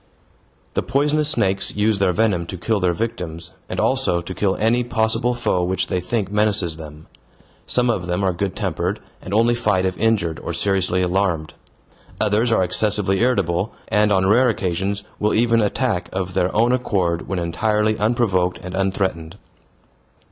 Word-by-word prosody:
The - - 0
poisonous 150 +2 +1
snakes 95 -9 +1
use 105 0 +2
their 95 -2 +3
venom 90 -3 +1
to 95 - -6
kill 110 +4 0
their 90 -2 +2
victims, 85 -5 -4 0.2
and - - -3
also 85 - +2
to 85 +2 -6
kill 95 0 0
any 115 +3 +1
possible 120 +1 0
foe 90 -6 0
which 95 +1 0
they 90 - -1
think 105 +1 -2
menaces 100 -6 +1
them. 75 -1 -11 0.6
Some 125 0 +2
of 90 -6 -3
them 90 +2 -1
are 95 -1 +1
good 95 +1 -3
tempered, - - -2 0.2
and 90 - -9
only 115 +3 +3
fight 105 -6 +1
if 95 -1 -1
injured 105 -8 +1
or 85 - -5
seriously 95 +1 +1
alarmed. 90 -4 0 0.7
Others 110 +3 +1
are 110 - +3
excessively 95 +1 +1
irritable, 100 -5 +1 0.2
and 105 0 +3
on 95 -1 +3
rare 120 +6 +4
occasions 100 0 -2 0.2
will 105 0 +1
even 115 0 +3
attack 105 -4 -1
of 95 -1 -3
their 90 -1 +1
own 115 +3 +3
accord 95 -9 0
when 95 - -2
entirely 105 +5 0
unprovoked 105 -6 +1
and 90 0 -7
unthreatened. 95 -3 -2
100 Hz, 165 wpm, -21 LUFS, 90-110 Hz, 0.7 s, rare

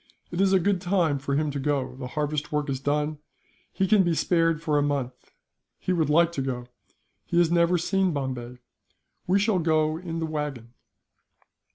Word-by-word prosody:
It 175 +2 -1
is 195 -1 +3
a 190 - +5
good 190 0 +1
time 175 -6 +1
for 140 +1 -2
him 150 0 0
to 140 - -4
go. 135 -2 -1
The 130 -1 -6
harvest 150 0 -1
work 150 -1 -1
is 135 - -2
done, 150 +2 -1 0.5
he 190 - 0
can 205 +1 +5
be 175 -3 +1
spared 165 -1 +2
for 150 -2 +1
a - - +2
month. 140 -3 -3 0.4
He 185 - -1
would 160 -4 +1
like 170 +2 +4
to 145 - -3
go. 125 -2 -3 0.6
He 170 - -1
has 170 -1 +4
never 170 +1 +3
seen 190 +2 +1
Bombay. 130 -4 -4 0.7
We 185 +2 +4
shall 205 -1 +2
go 155 -1 +1
in 170 -2 -5
the 165 - -1
wagon." 145 -7 -5
155 Hz, 190 wpm, -26 LUFS, 140-175 Hz, 0.7 s, a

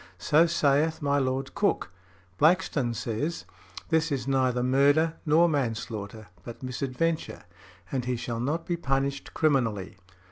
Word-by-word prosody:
So 160 +3 +4
saith 155 0 +2
my 145 0 +2
Lord 135 0 -2
Coke. 200 - 0 0.5
Blackstone 150 -7 +2
says, 120 +10 -3 0.4
"This 160 -1 +1
is 135 -2 -2
neither 130 -2 +1
murder 145 +5 +3
nor 165 +3 +5
manslaughter, 115 -7 -3 0.2
but 120 +2 -10
misadventure, 135 +5 -2 0.5
and 130 -3 -2
he 125 0 -1
shall 120 -1 -4
not 150 +7 -2
be 175 -2 -2
punished 135 -3 -2
criminally." 120 - 0
135 Hz, 130 wpm, -27 LUFS, 125-155 Hz, 0.5 s, nor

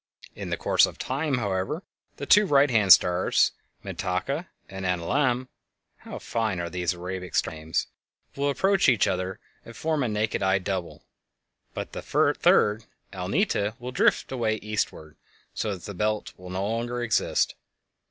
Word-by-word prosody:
In - - -7
the - - -1
course - - +4
of - - -10
time, 140 +2 -1
however, 100 - -2 0.3
the - - -5
two 205 0 +6
right 140 -3 +4
hand 105 -5 +4
stars, 90 +1 +5 0.3
Mintaka 100 - -2 0.2
and 95 0 -7
Alnilam 120 +9 0 0.5
(how - - -9
fine 110 -5 -2
are 85 -1 -4
these 90 -1 -1
Arabic 90 +1 -6
star - - +1
names!) 80 +1 -2 0.5
will 140 +1 0
approach 190 +4 +3
each 115 -6 +4
other 95 +1 -2 0.2
and 115 - -12
form 155 -2 0
a 125 - +1
naked 105 0 -1
eye 95 0 +3
double, 95 -2 -4 0.7
but - - -5
the - - -6
third, 105 +1 +3 0.3
Alnita, 100 - 0
will 125 +1 -6
drift - - +2
away 115 -4 0
eastward, 105 -8 -4 0.4
so 105 - -2
that 90 - -12
the 100 - -6
"Belt" 105 +3 -1
will 90 0 -11
no 95 +2 -2
longer 120 +2 -2
exist. 110 -3 +1
105 Hz, 155 wpm, -26 LUFS, 95-125 Hz, 0.7 s, two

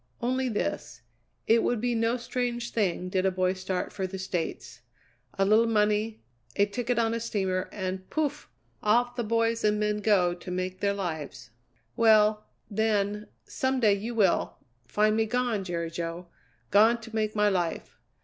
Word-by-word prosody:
"Only 255 +1 0
this: 210 - -3 0.4
It 225 +1 +4
would 240 - 0
be 245 +2 0
no 230 +1 +1
strange 240 -1 -3
thing 185 -4 0
did 185 0 0
a 190 - +3
boy 185 0 0
start 185 -1 -3
for 190 -1 -2
the 190 +1 -6
States. 170 -10 -4 0.6
A 195 - +3
little 220 +3 +4
money, 210 - +1 0.3
a 200 - +4
ticket 240 +4 -2
on 225 -1 +2
a 230 - -1
steamer, 190 -5 -2
and 185 -1 -5
pouf! 310 -3 -2 0.3
Off 240 +3 +2
the 240 - -1
boys 230 +1 0
and 210 0 +2
men 210 0 0
go 195 -4 +3
to 175 +1 -10
make 185 +1 -3
their 200 0 +1
lives. 155 - -5 0.4
Well, 215 -1 +4 0.2
then, 210 -1 0 0.2
some 260 0 -1
day 215 -4 +4
you 220 +4 -4
will 200 -5 +2 0.3
find 215 - +2
me 220 0 +1
gone, 245 -3 0
Jerry 170 -2 -3
Jo. 170 +1 -5 0.4
Gone 220 +4 +5
to 225 0 -9
make 215 -1 -1
my 210 0 +3
life. 175 -4 -2
210 Hz, 170 wpm, -28 LUFS, 185-230 Hz, 0.6 s, Gone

